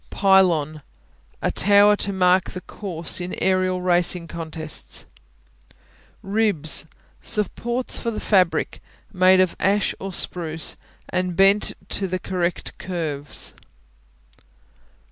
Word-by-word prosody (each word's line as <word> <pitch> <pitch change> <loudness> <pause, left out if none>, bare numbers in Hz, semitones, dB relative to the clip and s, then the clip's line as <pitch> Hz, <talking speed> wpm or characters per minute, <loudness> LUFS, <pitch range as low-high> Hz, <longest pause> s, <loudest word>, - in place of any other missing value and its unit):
Pylon 175 -6 +3 0.6
A - - +1
tower 205 +1 +5
to 200 - -2
mark 185 -1 +2
the 185 - -8
course 180 -4 -3
in 175 +1 -4
aerial 185 -1 +1
racing 175 -1 +1
contests. 160 -2 -4 1.2
Ribs 195 -8 +1 0.3
Supports 235 +3 -1
for 235 - -2
the 220 - -4
fabric, 185 -5 +1 0.3
made 185 0 +5
of 185 -2 +2
ash 200 +1 +1
or 195 0 -5
spruce 165 -3 0 0.3
and 180 -1 -2
bent 195 +2 +4 0.2
to 195 - -1
the 185 0 -2
correct 180 -1 -3
curves. 155 -6 -4
185 Hz, 105 wpm, -22 LUFS, 170-195 Hz, 1.2 s, tower